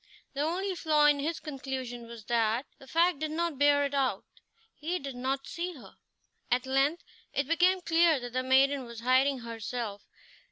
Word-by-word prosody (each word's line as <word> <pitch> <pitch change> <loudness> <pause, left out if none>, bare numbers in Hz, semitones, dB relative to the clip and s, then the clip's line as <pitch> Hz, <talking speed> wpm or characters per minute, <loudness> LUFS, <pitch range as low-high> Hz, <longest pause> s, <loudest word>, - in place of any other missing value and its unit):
The 280 - -2
only 370 +6 -1
flaw 310 -4 +2
in 295 -1 +5
his 315 +3 -2
conclusion 260 -4 -6
was 230 -2 -10
that 230 +2 +1
the 270 - -14
fact 335 +1 +2
did 310 0 -2
not 325 -2 -2
bear 285 0 +4
it 280 - -4
out; 270 -2 0 0.5
he 335 +4 -3
did 275 -5 -6
not 265 +2 -2
see 345 +4 -4
her. 265 - -14 0.5
At 250 +1 +1
length 275 +6 +1 0.3
it 280 - 0
became 360 +3 +3
clear 330 -3 +3
that 245 -1 -7
the 255 - +1
maiden 265 +1 +3
was 235 -1 -9
hiding 260 +2 +3
herself. 230 -2 -5
275 Hz, 175 wpm, -29 LUFS, 250-315 Hz, 0.5 s, in